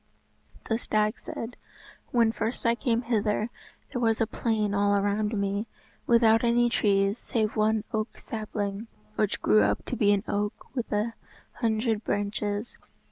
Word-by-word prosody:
The 225 0 0
stag 215 -2 0
said, 230 +2 -6 0.5
"When 230 -2 +3
first 225 +2 -3
I 230 - +5
came 235 -1 0
hither, 220 -1 0 0.4
there 245 - -1
was 225 -2 +2
a 225 - +3
plain 215 -2 -1
all 200 0 +3
around 205 +1 0
me, 200 +2 -1 0.4
without 225 -1 +5
any 240 0 +4
trees 200 -1 +2
save 220 -2 -1
one 215 0 +2
oak 215 +1 -2
sapling, 210 -1 -4 0.3
which 210 -2 0
grew 105 0 +5
up 105 0 +1
to - - -3
be 205 -3 +3
an 200 -1 +2
oak 205 +5 -3
with 245 -3 -3
an 215 +2 0 0.5
hundred 225 -2 +1
branches. 205 +2 -2
215 Hz, 150 wpm, -27 LUFS, 205-230 Hz, 0.5 s, I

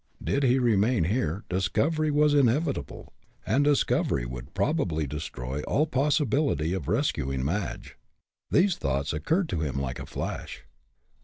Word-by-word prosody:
Did 140 - 0
he 130 -1 +4
remain 115 -3 +2
here, 95 -1 -1
discovery 145 - 0
was 150 0 +3
inevitable, 140 - 0 0.3
and 140 - +2
discovery 145 - +1
would - - -8
probably 80 -1 0
destroy 70 -2 -5
all 145 - +1
possibility 140 - +1
of 90 -7 -4
rescuing 70 - 0
Madge. 90 +4 -3 0.5
These 190 0 +3
thoughts 70 +2 -1
occurred 160 - 0
to 85 - -2
him 70 -4 -2
like 65 -2 -4
a - - -7
flash. - - -5
100 Hz, 135 wpm, -27 LUFS, -, 0.5 s, he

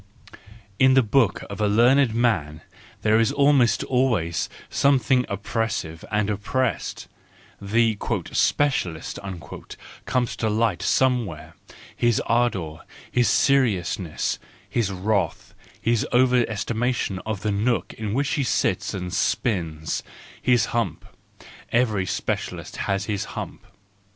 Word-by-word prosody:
*.. - - -26 0.3
In 130 0 +6
the 135 - +6
book 110 -2 +2
of 100 +1 -6
a 105 - +3
learned 120 +3 +4
man 85 -11 0 0.4
there 110 +1 +4
is 115 - +3
almost 140 -4 +3
always 115 - 0 0.2
something 135 -2 +2
oppressive 100 -5 -3
and 105 -1 +1
oppressed: 105 +5 -2 0.5
the 110 +2 +2 0.3
" - - -12
specialist 90 - 0 0.5
" - - -14
comes 125 -2 0
to 110 - 0
light 110 -3 +1
somewhere, 100 -12 0 0.4
his 120 -2 +2
ardour, 100 -10 0 0.3
his 125 -1 +3
seriousness, 100 - +1 0.3
his 110 -5 -1
wrath, 95 -2 -1 0.3
his 115 -1 +1
over 125 -1 +3
estimation 110 -2 -1
of 105 0 -4
the 105 0 -1
nook 110 +4 0
in 110 -1 -4
which 140 +1 +1
he 145 - 0
sits 125 - 0
and 90 -1 -5
spins, 80 -8 -1 0.4
his 125 -2 +3
hump— 120 -1 -1 0.7
every 110 -6 +1
specialist - - -3
has 100 0 0
his 105 -2 -2
hump. - - -7
110 Hz, 120 wpm, -24 LUFS, 100-125 Hz, 0.7 s, In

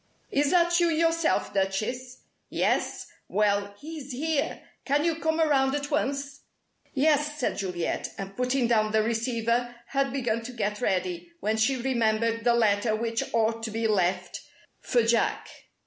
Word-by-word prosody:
"Is 285 0 +2
that 345 0 +4
you 345 - +4
yourself, 330 0 +1
Duchess? 215 +7 -2 0.3
Yes? - - 0 0.2
Well, 200 -1 +1
he's 300 -3 -8
here! 290 +3 -1 0.2
Can 290 +3 +1
you 330 -2 +1
come 320 0 0
around 275 -4 +3
at 285 0 -4
once?" 280 -1 -1 0.6
"Yes," 295 +1 +2
said 255 - -1
Juliet, 180 -3 -2
and 195 0 -6
putting 250 0 +1
down 215 -2 +2
the 220 0 +4
receiver 235 +1 0
had 275 -1 0
begun 240 -4 -1
to 245 +2 -8
get 210 -1 -2
ready, 180 -4 -1
when 215 +2 0
she 220 +5 +2
remembered 230 -2 0
the 240 0 +4
letter 215 -1 +2
which 230 +1 -2
ought 225 0 +1
to 225 - -3
be 225 +1 -2
left 185 -3 0 0.4
for 240 -2 +1
Jack. 230 0 +1
235 Hz, 150 wpm, -27 LUFS, 215-280 Hz, 0.6 s, that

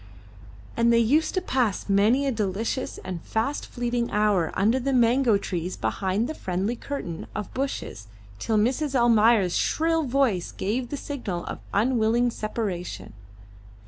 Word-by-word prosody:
And 235 0 +3
they 235 - +5
used 280 - +2
to 370 - +1
pass 245 - 0
many 210 +8 +3
a 275 - +1
delicious 220 +3 -2
and 180 -3 -5
fast 230 - -2
fleeting 240 -1 -2
hour 205 -6 +2
under 225 +6 +2
the 270 +2 -1
mango 240 -2 +4
trees 180 -2 -4
behind 190 - -1
the 315 - -4
friendly 190 - -2
curtain 230 - -6
of 210 - -5
bushes 260 - -4 0.3
till 220 - 0
Mrs. 265 +6 +1
Almayer's 225 -5 +4
shrill 325 +1 +1
voice 255 - 0
gave 235 +5 -2
the 285 - -4
signal 230 -13 -5
of - - -6
unwilling 235 +1 +2
separation. 205 - -4
230 Hz, 145 wpm, -25 LUFS, 200-260 Hz, 0.3 s, they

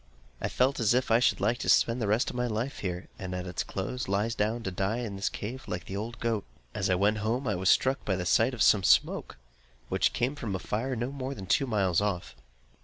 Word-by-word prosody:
I - - 0
felt 130 +2 +1
as 115 0 +3
if 130 -2 +1
I 115 - +6
should 125 - +2
like 120 +2 +1
to - - -2
spend 120 +1 +4
the 110 - 0
rest 110 +4 +1
of - - -11
my 125 0 0
life 115 +4 -3
here; 90 -1 -4
and 95 -1 -4
at 90 0 -4
its 90 -1 -3
close, 120 +6 -4
lie 100 +3 +1
down 115 +1 -1
to 95 - -3
die 95 +5 -1
in 115 -5 -4
this 100 +1 -1
cave, 125 +6 -6
like 90 - -4
the 95 - -6
old 115 +4 -5
goat. 115 -4 -1 0.3
As 100 -1 -1
I 90 - +3
went 105 +3 +2
home 115 +5 -1
I 105 - +1
was 95 0 +1
struck 130 +1 +3
by 95 - 0
the 90 -1 -3
sight 115 +7 +3
of 115 - +2
some 105 - +5
smoke, 90 - +2 0.5
which - - +2
came 125 +4 0
from 110 -9 -4
a - - -2
fire 115 +8 -2
no 120 +3 -2
more 140 0 -4
than 95 - -7
two 135 +8 +2
miles 100 -6 +2
off. 90 -10 -2
110 Hz, 250 wpm, -29 LUFS, 95-125 Hz, 0.5 s, I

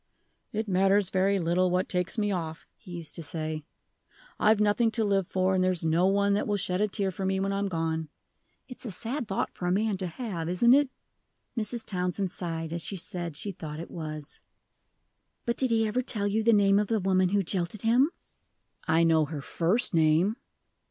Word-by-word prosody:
'It 220 +1 -2
matters 195 0 +3
very 195 +1 +2
little 180 +1 +2
what 180 +1 +1
takes 180 +4 -2
me 205 -1 +1
off,' 165 -4 -4
he 210 - -17
used 170 -3 -5
to 170 - -5
say; 155 -1 -4 0.7
'I've 215 0 +4
nothing 210 +2 +3
to 225 0 0
live 195 -3 +1
for, 185 0 +1
and 185 -1 +2
there's 185 -3 0
no 165 +3 +3
one 200 +1 +2
that 205 - 0
will 205 -1 +1
shed 180 0 -1
a 210 - +3
tear 195 -1 -1
for 190 - -6
me 190 0 0
when 195 +1 0
I 195 - -1
am 200 - 0
gone.' 160 -3 -2 0.6
It's 250 - -8
a 240 - -5
sad 235 +6 -4
thought 195 - -2
for 180 - -4
a - - +2
man 205 +1 +1
to 185 -1 -3
have, 170 -4 -4
isn't 235 +7 +5
it?" 285 0 +4 0.7
Mrs. 230 0 -2
Townsend 180 0 -2
sighed 165 -3 -4
as 170 - -2
she 195 - -5
said 175 -4 -4
she 200 - -4
thought 155 -4 -7
it 165 - -8
was. 155 -3 -7 1.0
"But 235 - 0
did 260 - +2
he 225 -1 +2
ever 235 +4 0
tell 215 -5 0
you 205 +2 +1
the 230 +1 +4
name 200 -2 +5
of 210 - 0
the 225 0 +1
woman 185 -1 +2
who 200 +1 +2
jilted 185 +3 -2
him?" 245 +6 +4 0.8
"I 160 +1 +4
know 160 -2 +4
her 150 0 -5
first 180 - 0
name." 165 +6 +3
190 Hz, 205 wpm, -28 LUFS, 170-210 Hz, 1.0 s, isn't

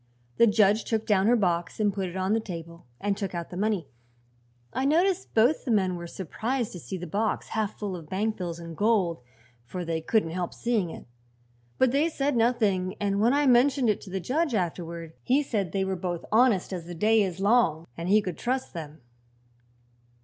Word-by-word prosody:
The 235 - +6
judge 210 0 +3
took 220 -1 -1
down 200 -1 +3
her 240 - +5
box 175 -5 0
and 205 -2 +2
put 190 -2 -2
it 175 - -10
on 190 +2 +1
the 225 - +2
table 170 - -8
and 200 0 0
took 195 -2 -4
out 170 -1 -5
the - - -7
money. 200 -5 0 0.9
I 260 - -1
noticed 355 +6 +1
both 240 +7 +4
the - - -5
men 190 -5 +2
were 170 0 -6
surprised 225 - -3
to 180 - -8
see 190 +3 -6
the 180 - -6
box 210 +6 -1
half 215 -2 -2
full 200 -3 -4
of 160 -3 -10
bank 215 +3 -1
bills 175 -3 -4
and 170 -1 -8
gold, 200 - +1 0.4
for 180 +8 -6
they 165 -1 -2
couldn't 165 -1 +1
help 175 0 -3
seeing 225 -7 0
it; - - -9 0.7
but 260 -2 +4
they 290 +5 +2
said 285 -3 -1
nothing 210 -6 +1
and 200 0 0
when 235 +4 +4
I 290 0 +3
mentioned 255 -1 +4
it 205 - -4
to 195 - -11
the 190 +1 -2
judge, 270 - 0
afterward, 170 -3 -3
he 275 +4 +2
said 205 - -2
they 195 -1 0
were 190 0 -1
both 175 -1 -4
honest 220 -5 +3
as 170 -2 -5
the 175 - -7
day 215 +5 +3
is 190 -3 -2
long, 195 -7 +3
and 170 +2 -4
he 210 +1 +5
could 180 -4 -5
trust 255 +2 -2
them." 155 -4 -8
200 Hz, 210 wpm, -27 LUFS, 175-230 Hz, 0.9 s, The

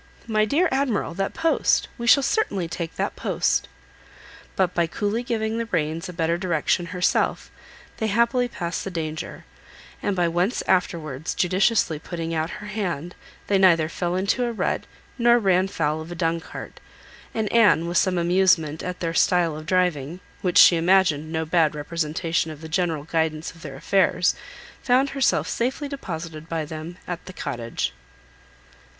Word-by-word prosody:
My 215 -2 +2
dear 315 - +2
Admiral, 265 -10 0
that 195 +2 -3
post! 330 - +2
we 235 - -3
shall 280 +3 +6
certainly 205 - 0
take 165 0 -5
that - - -2
post." - - 0 0.9
But 185 -2 +1
by 170 -1 +1
coolly 205 +7 -2
giving 225 -2 -2
the 230 - -3
reins 160 -3 -2
a - - -7
better 165 0 0
direction 175 -1 0
herself 180 0 0 0.5
they 220 - -1
happily 235 +3 +2
passed 175 -7 -4
the - - -4
danger; 160 -3 -5 0.6
and 200 - -1
by 175 -2 +2
once 175 +7 0
afterwards 160 -5 -1
judiciously 185 -3 +2
putting 165 0 -5
out 160 0 -1
her 210 - -9
hand 180 -6 -3 0.3
they 200 -1 +2
neither 170 -4 +5
fell 175 +2 -2
into 200 +7 +1
a 240 - 0
rut, 225 - -1 0.3
nor 240 0 +5
ran 190 -4 +2
foul 155 -4 -1
of 160 +2 -9
a - - -5
dung 165 -1 0
cart; - - -9 0.6
and 220 -1 0
Anne, 205 -8 +5
with 175 0 +2
some 185 -2 +1
amusement 175 -3 +2
at 180 0 -5
their 165 -1 -1
style 170 -2 +2
of 155 +1 -9
driving, 175 -4 0 0.2
which 180 -2 +1
she 170 - +8
imagined 165 -3 +3
no 160 0 -1
bad 160 -2 +2
representation 160 +1 -1
of 155 -1 -9
the 160 - -7
general 165 -3 -1
guidance 160 0 -1
of 165 - -17
their 145 -4 -8
affairs, 180 +4 +2 0.5
found 265 +2 +2
herself 275 -2 +1
safely 260 +5 -2
deposited 165 - -6
by 160 -2 -2
them 160 +3 -7
at 175 -1 -5
the 185 - -8
Cottage. 120 -9 -3
175 Hz, 165 wpm, -24 LUFS, 160-205 Hz, 0.9 s, she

